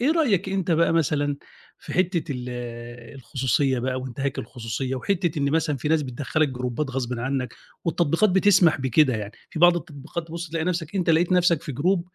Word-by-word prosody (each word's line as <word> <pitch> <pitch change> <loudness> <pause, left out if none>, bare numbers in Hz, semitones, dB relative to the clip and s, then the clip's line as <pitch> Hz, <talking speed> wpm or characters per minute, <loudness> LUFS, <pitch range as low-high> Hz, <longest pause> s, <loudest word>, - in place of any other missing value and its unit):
إيه 260 +5 +3
رأيك 220 - +2
أنت 190 -2 -1
بقى 165 0 +3
مثلًا 145 -3 +1 0.4
في - - -9
حتة 175 -4 0
ال 125 0 -5 0.7
الخصوصية 130 +1 0
بقى 130 +1 -1
وانتهاك 130 +2 -4
الخصوصية 120 +2 -4
وحِتة 175 +2 -1
إن 140 -1 +1
مثلًا 155 -1 +1
في 135 - -3
ناس 160 -1 +3
بتدخّلك 145 +3 -1
جروبات 125 +2 -3
غصبٍ 125 -2 -3
عنك 130 0 -2 0.3
والتطبيقات 170 +4 +2
بتسمح 185 -5 +4
بكده 130 +1 +3
يعني 105 0 -6 0.2
في - - -6
بعض 175 +1 +6
التطبيقات 160 +1 -6
تبص 170 0 -6
تلاقي 160 -1 -1
نفسك 170 -1 -2
أنت 180 -3 +2
لقيت 165 +3 +3
نفسك 175 -3 +3
في 145 - -5
group 175 +8 +1
150 Hz, 180 wpm, -24 LUFS, 130-175 Hz, 0.7 s, بعض